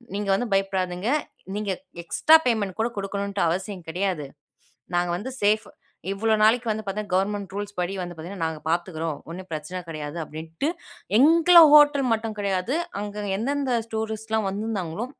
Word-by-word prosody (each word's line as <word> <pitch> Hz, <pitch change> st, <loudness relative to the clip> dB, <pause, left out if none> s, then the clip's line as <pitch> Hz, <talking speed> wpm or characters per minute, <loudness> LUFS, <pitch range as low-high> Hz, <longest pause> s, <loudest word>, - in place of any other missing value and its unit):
நீங்க 205 Hz, -1 st, -2 dB
வந்து 245 Hz, +5 st, -1 dB
பயப்படாதீங்க 190 Hz, +1 st, 0 dB, 0.5 s
நீங்க 205 Hz, -1 st, -2 dB, 0.3 s
எக்ஸ்ட்ரா 310 Hz, -, +5 dB
பேமெண்ட் 210 Hz, -6 st, 0 dB
கூட 225 Hz, -, +2 dB
குடுக்கணும்ட்டு 200 Hz, 0 st, -3 dB
அவசியம் 185 Hz, +2 st, -3 dB
கிடையாது. 180 Hz, -3 st, -1 dB, 0.7 s
நாங்க 175 Hz, 0 st, +1 dB
வந்து 210 Hz, +9 st, -5 dB
சேஃப் 215 Hz, +1 st, +3 dB, 0.5 s
இவ்ளோ 220 Hz, +2 st, +1 dB
நாளைக்கு 225 Hz, +1 st, +4 dB
வந்து 220 Hz, 0 st, -5 dB
பாத்தீங்கன்னா 200 Hz, -1 st, -3 dB
கவர்மெண்ட் 200 Hz, +1 st, -1 dB
ரூல்ஸ் 205 Hz, -1 st, -5 dB
படி 180 Hz, +2 st, -2 dB
வந்து 175 Hz, -1 st, -7 dB
பாத்தீங்கன்னா, 170 Hz, +2 st, -5 dB
நாங்க 160 Hz, -1 st, -5 dB
பாத்துக்றோம், 165 Hz, -3 st, -2 dB
ஒன்னும் 185 Hz, +2 st, -8 dB
ப்ரச்சன 160 Hz, +4 st, -5 dB
கடையாது 155 Hz, 0 st, -5 dB
அப்டின்டு, 160 Hz, -, -4 dB, 0.5 s
எங்களோட 335 Hz, +4 st, +7 dB, 0.2 s
ஹோட்டல் 290 Hz, -3 st, +6 dB
மட்டும் 220 Hz, -1 st, -2 dB
கெடையாது. 200 Hz, -, 0 dB, 0.3 s
அங்க 205 Hz, 0 st, -5 dB
எந்தெந்த 270 Hz, 0 st, 0 dB, 0.2 s
டூரிஸ்ட்லாம் 220 Hz, -1 st, -2 dB
வந்திருந்தாங்களோ, 205 Hz, -1 st, -3 dB
200 Hz, 140 wpm, -25 LUFS, 180-220 Hz, 0.7 s, எங்களோட